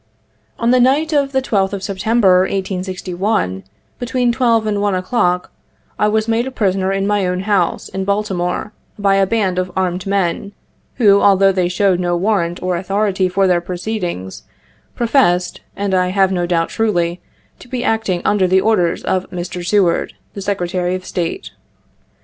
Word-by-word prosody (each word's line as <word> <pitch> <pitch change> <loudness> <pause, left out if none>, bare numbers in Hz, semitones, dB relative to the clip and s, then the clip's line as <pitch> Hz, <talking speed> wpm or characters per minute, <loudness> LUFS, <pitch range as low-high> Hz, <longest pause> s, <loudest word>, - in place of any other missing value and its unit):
" - - -42
On 235 +1 +1
the 255 - +4
night 285 +6 +2
of 280 -2 +1
the 265 -1 0
12th 195 -5 0
of 195 -1 -4
September, 195 -1 +2
1861, 185 - -2 0.4
between 245 0 0
12 235 -3 +2
and 205 -1 -1
1 205 -2 +1
o'clock, 185 -2 0 0.5
I 210 - +3
was 215 +1 0
made 235 +3 -1
prisoner 190 -2 0
in 195 0 -1
my 205 -2 +1
own 180 0 -1
house, 200 0 0
in 190 - -4
Baltimore, 200 -1 -2 0.2
by 200 -1 +2
a 195 -1 +3
band 190 -4 0
of 185 0 -3
armed 185 0 -1
men, 200 0 -1 0.4
who, 200 -5 +4
although 195 -1 +5
they 185 -2 0
showed 185 0 +1
no 175 -1 0
warrant 180 -3 -1
or 180 -1 0
authority 195 0 0
for 195 +1 +1
their 180 -2 +2
proceedings, 180 - -4 0.5
professed, 225 -8 +1
and 200 -1 -2
I 180 -1 +2
have 190 +1 +2
no 175 -2 -1
doubt 165 -1 0
truly, 175 -5 -1 0.4
to - - -14
be 250 -1 -3
acting 210 -6 0
under 200 -3 +2
the 190 +1 +4
orders 190 -5 +1
of 185 0 -1
Mr. 175 0 -5
Seward, 185 -2 +1 0.2
the 200 - -7
Secretary 180 -2 -1
of 185 0 -7
State. 170 -2 -4
195 Hz, 165 wpm, -17 LUFS, 180-215 Hz, 0.5 s, although